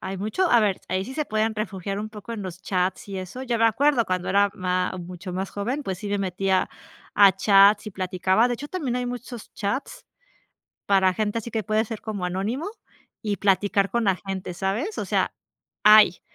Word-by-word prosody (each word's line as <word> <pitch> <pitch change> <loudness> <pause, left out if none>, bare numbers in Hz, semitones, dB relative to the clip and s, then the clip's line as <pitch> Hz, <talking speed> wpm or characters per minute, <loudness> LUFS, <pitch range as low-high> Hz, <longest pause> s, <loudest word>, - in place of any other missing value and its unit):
hay 190 +1 -5
mucho 220 - 0
a 240 - +6
ver, 205 -4 +1
ahí 185 +1 -1
sí 260 - -8
se 305 - -1
pueden 220 -2 0
refugiar 195 -2 -4
un 215 - -5
poco 215 +1 -9
en 220 -3 -5
los 185 -1 -7
chats 185 0 -1
y 195 -1 -5
eso 185 +8 -7
yo 240 -2 0
me 230 0 +4
acuerdo 260 +2 +3
cuando 185 -2 -2
era 200 +1 +3
má 180 0 -1
mucho 180 +1 -8
más 190 +2 -3
joven 245 +9 -3
pues 190 -5 -3
sí 205 - -6
me 205 0 0
metía 190 0 0 0.5
a 200 -1 +8
chats 200 +2 +5
y 210 - -6
platicaba 185 +4 +1
de 245 - 0
hecho, 280 +5 -7
también 290 -8 -3
hay 250 0 -2
muchos 245 -1 -7
chats 260 - -4 0.8
para 190 -2 +3
gente, 215 +3 -1
así 230 0 -7
que 220 -1 -1
puede 215 +3 +1
ser 225 -1 -6
como 210 -4 -5
anónimo 200 - -2 0.5
y 210 -2 -1
platicar 200 0 +2
con 235 - 0
la 195 -4 +2
gente, 190 -1 -5
¿sabes?, 200 - -2
o - - -1
sea - - 0 0.5
hay 210 -3 +7
205 Hz, 205 wpm, -24 LUFS, 190-230 Hz, 0.8 s, a